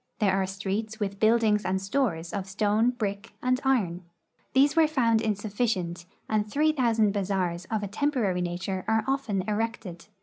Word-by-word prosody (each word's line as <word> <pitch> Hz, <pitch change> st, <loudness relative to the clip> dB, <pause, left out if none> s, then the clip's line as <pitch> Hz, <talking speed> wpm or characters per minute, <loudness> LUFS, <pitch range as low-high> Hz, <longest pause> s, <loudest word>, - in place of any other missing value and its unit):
There 200 Hz, -4 st, +2 dB
are 190 Hz, -1 st, +1 dB
streets 200 Hz, +3 st, -3 dB
with 200 Hz, -1 st, -3 dB
buildings 220 Hz, -1 st, +3 dB
and 185 Hz, +1 st, 0 dB
stores 195 Hz, -5 st, -1 dB
of 195 Hz, -2 st, -3 dB
stone, 210 Hz, +3 st, +2 dB
brick, 205 Hz, -5 st, -4 dB
and 255 Hz, +1 st, +1 dB
iron. 195 Hz, -10 st, +1 dB, 0.5 s
These 280 Hz, +2 st, +4 dB
were 325 Hz, -1 st, +5 dB
found 235 Hz, -7 st, +2 dB
insufficient, 205 Hz, -5 st, -2 dB, 0.2 s
and 215 Hz, -1 st, 0 dB
three 305 Hz, +7 st, +3 dB
thousand 230 Hz, -7 st, +2 dB
bazaars 185 Hz, -3 st, -1 dB
of 215 Hz, +1 st, -2 dB
a -, -, -2 dB
temporary 220 Hz, -5 st, 0 dB
nature 180 Hz, +2 st, -3 dB
are 220 Hz, 0 st, +2 dB
often 265 Hz, -9 st, 0 dB
erected. 210 Hz, -4 st, -3 dB
210 Hz, 160 wpm, -27 LUFS, 190-230 Hz, 0.5 s, were